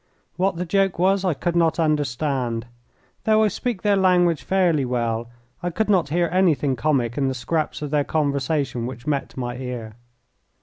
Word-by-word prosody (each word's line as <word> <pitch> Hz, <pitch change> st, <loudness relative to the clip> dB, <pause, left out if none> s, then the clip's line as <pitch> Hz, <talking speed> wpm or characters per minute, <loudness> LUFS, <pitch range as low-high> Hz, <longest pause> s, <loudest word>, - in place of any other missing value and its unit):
What 190 Hz, +1 st, +1 dB
the 180 Hz, +2 st, -3 dB
joke 195 Hz, +1 st, +1 dB
was 190 Hz, +2 st, +2 dB
I 180 Hz, -5 st, +1 dB
could 175 Hz, +4 st, -2 dB
not 165 Hz, -2 st, +2 dB
understand. 135 Hz, -6 st, 0 dB, 0.6 s
Though 220 Hz, 0 st, +4 dB
I 215 Hz, -, +3 dB
speak 230 Hz, -3 st, -3 dB
their 205 Hz, -1 st, +3 dB
language 180 Hz, -4 st, +3 dB
fairly 175 Hz, -6 st, +2 dB
well 120 Hz, -2 st, -2 dB, 0.3 s
I 175 Hz, -, -1 dB
could 210 Hz, +5 st, 0 dB
not 175 Hz, -7 st, +2 dB
hear 170 Hz, +3 st, +1 dB
anything 160 Hz, -7 st, +2 dB
comic 125 Hz, -1 st, 0 dB
in 135 Hz, -, +1 dB
the 130 Hz, -, -1 dB
scraps 155 Hz, +5 st, -2 dB
of 145 Hz, -, -4 dB
their 150 Hz, -1 st, +2 dB
conversation 140 Hz, -4 st, -1 dB
which 125 Hz, -1 st, -8 dB
met 145 Hz, -3 st, -2 dB
my 120 Hz, -1 st, -3 dB
ear. 125 Hz, -4 st, -6 dB
150 Hz, 175 wpm, -23 LUFS, 130-180 Hz, 0.6 s, Though